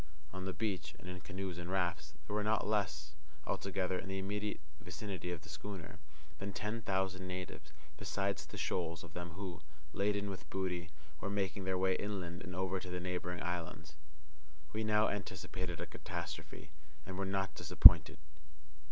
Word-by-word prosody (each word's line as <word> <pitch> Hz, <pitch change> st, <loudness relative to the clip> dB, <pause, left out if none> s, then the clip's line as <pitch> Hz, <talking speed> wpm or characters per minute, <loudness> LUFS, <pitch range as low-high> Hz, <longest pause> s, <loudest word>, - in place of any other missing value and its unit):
On 95 Hz, 0 st, -4 dB
the 95 Hz, -, -1 dB
beach, 90 Hz, -8 st, -2 dB
and 90 Hz, -, -12 dB
in 90 Hz, 0 st, -5 dB
canoes 95 Hz, -3 st, -4 dB
and 85 Hz, 0 st, -5 dB
rafts, 85 Hz, -5 st, 0 dB
there 105 Hz, -, -5 dB
were 105 Hz, -, +2 dB
not 110 Hz, 0 st, +2 dB
less, 85 Hz, -8 st, 0 dB, 0.3 s
altogether, 95 Hz, -1 st, 0 dB
in 100 Hz, -, -6 dB
the 95 Hz, -, -2 dB
immediate 100 Hz, +2 st, -2 dB, 0.2 s
vicinity 90 Hz, -1 st, -5 dB
of 85 Hz, -4 st, -3 dB
the -, -, -13 dB
schooner, 100 Hz, -5 st, -6 dB, 0.4 s
than 100 Hz, +1 st, -3 dB
ten 105 Hz, +4 st, -2 dB
thousand 95 Hz, -2 st, 0 dB
natives, 90 Hz, -5 st, -5 dB, 0.3 s
besides 100 Hz, +1 st, -1 dB
the -, -, -8 dB
shoals 85 Hz, -2 st, -1 dB
of -, -, -11 dB
them 85 Hz, -1 st, -5 dB
who, 90 Hz, -2 st, -5 dB, 0.3 s
laden 100 Hz, 0 st, +1 dB
with 85 Hz, -5 st, -8 dB
booty, 90 Hz, -3 st, -2 dB, 0.3 s
were 100 Hz, -, -2 dB
making 100 Hz, -1 st, -1 dB
their 95 Hz, -1 st, +1 dB
way 95 Hz, 0 st, +3 dB
inland 95 Hz, -4 st, -3 dB
and 90 Hz, -2 st, -6 dB
over 95 Hz, +1 st, 0 dB
to 90 Hz, -, -7 dB
the 90 Hz, 0 st, -2 dB
neighbouring 90 Hz, 0 st, -2 dB
islands. 80 Hz, -3 st, -4 dB, 0.8 s
We 110 Hz, +1 st, 0 dB
now 105 Hz, 0 st, +4 dB
anticipated 95 Hz, -3 st, -3 dB
a -, -, -2 dB
catastrophe, -, -, -6 dB, 0.3 s
and 95 Hz, -, -5 dB
were 100 Hz, -, -1 dB
not 95 Hz, 0 st, 0 dB
disappointed. -, -, +10 dB
95 Hz, 170 wpm, -36 LUFS, 90-100 Hz, 0.8 s, disappointed